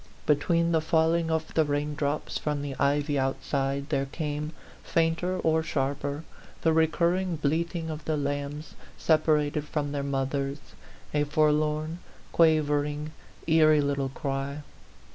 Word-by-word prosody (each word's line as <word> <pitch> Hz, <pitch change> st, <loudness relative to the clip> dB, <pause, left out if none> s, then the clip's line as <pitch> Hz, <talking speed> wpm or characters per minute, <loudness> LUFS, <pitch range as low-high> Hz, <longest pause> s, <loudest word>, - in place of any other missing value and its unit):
Between 165 Hz, +3 st, +2 dB
the 160 Hz, -1 st, +3 dB
falling 165 Hz, +1 st, +2 dB
of 160 Hz, 0 st, -1 dB
the 160 Hz, -, +4 dB
raindrops 145 Hz, 0 st, -2 dB
from 150 Hz, -1 st, -2 dB
the 140 Hz, -2 st, -4 dB
ivy 145 Hz, 0 st, +2 dB
outside 135 Hz, +1 st, -1 dB
there 140 Hz, -3 st, 0 dB
came, 150 Hz, +1 st, -3 dB, 0.3 s
fainter 165 Hz, +3 st, +1 dB
or 160 Hz, -2 st, +2 dB
sharper, 145 Hz, 0 st, -2 dB, 0.4 s
the 160 Hz, -, +4 dB
recurring 170 Hz, +3 st, +2 dB
bleating 160 Hz, +2 st, -1 dB
of 155 Hz, -1 st, -7 dB
the 155 Hz, -1 st, 0 dB
lambs 145 Hz, +1 st, -3 dB, 0.2 s
separated 150 Hz, -2 st, +2 dB
from 145 Hz, -1 st, -2 dB
their 145 Hz, -1 st, -2 dB
mothers, 140 Hz, 0 st, -1 dB, 0.6 s
a 150 Hz, 0 st, +2 dB
forlorn, 155 Hz, +2 st, +1 dB, 0.3 s
quavering, 150 Hz, -2 st, +2 dB, 0.3 s
eerie 155 Hz, -2 st, +5 dB
little 140 Hz, -1 st, 0 dB
cry. 140 Hz, +1 st, -3 dB
150 Hz, 125 wpm, -27 LUFS, 145-160 Hz, 0.6 s, eerie